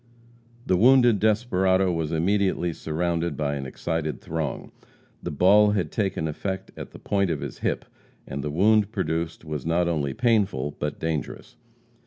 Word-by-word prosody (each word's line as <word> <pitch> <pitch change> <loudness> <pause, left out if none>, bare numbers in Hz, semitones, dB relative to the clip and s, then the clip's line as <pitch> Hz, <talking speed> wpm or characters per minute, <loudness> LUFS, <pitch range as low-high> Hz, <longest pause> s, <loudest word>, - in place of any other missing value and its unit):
The 95 - +2
wounded 120 0 +5
desperado 95 -4 +2
was 80 -2 -2
immediately 90 0 +1
surrounded 85 -1 -2
by 75 -2 -1
an 70 -2 -4
excited 80 +3 -3
throng. 80 -3 -4 0.5
The - - -4
ball 105 +7 +5
had 95 -4 -1
taken 95 -7 -1
effect 95 +5 -4
at - - -8
the - - -12
point 100 -2 0
of 80 -4 -2
his - - -6
hip, - - -2 0.4
and 70 +1 -5
the 75 - -2
wound 105 +6 +3
produced 85 -4 -3
was 75 -4 -4
not 85 +2 +1
only 75 -5 -1
painful 100 - +1
but 75 0 -3
dangerous. 80 -5 -4
85 Hz, 155 wpm, -25 LUFS, 80-100 Hz, 0.5 s, wounded